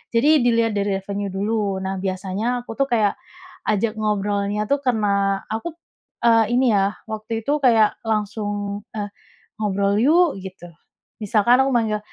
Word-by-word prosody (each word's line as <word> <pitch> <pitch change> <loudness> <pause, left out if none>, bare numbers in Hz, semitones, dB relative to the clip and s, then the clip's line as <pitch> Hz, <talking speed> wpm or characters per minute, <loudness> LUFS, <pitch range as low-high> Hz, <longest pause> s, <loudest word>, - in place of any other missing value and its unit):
Jadi 245 +6 +3 0.2
dilihat 230 -2 +3
dari 200 -1 0
revenue 200 +1 -4
dulu. 200 -2 -1
Nah 190 0 -3
biasanya 190 +2 -3 0.2
aku 225 - -9
tuh 275 - +2
kayak, 215 -5 +1 0.5
ajak 215 +1 +1
ngobrolnya 205 -1 -1
tuh 280 - +3
kena, 200 -4 +1
aku, 225 +9 -3 0.6
eee, 230 -1 +5
ini 255 -2 +3
ya 200 +1 +1 0.2
waktu 220 +1 -7
itu 285 - -1
kayak 220 -3 +4
langsung, 210 -1 -1 0.4
eee, 205 -1 -3 0.5
"Ngobrol 200 -1 +1
yuk!" 335 +5 +5 0.2
gitu. 185 -2 -9 0.6
Misalkan 215 +4 +3
aku 270 - 0
manggil, 215 -2 +1
210 Hz, 145 wpm, -22 LUFS, 200-225 Hz, 0.6 s, eee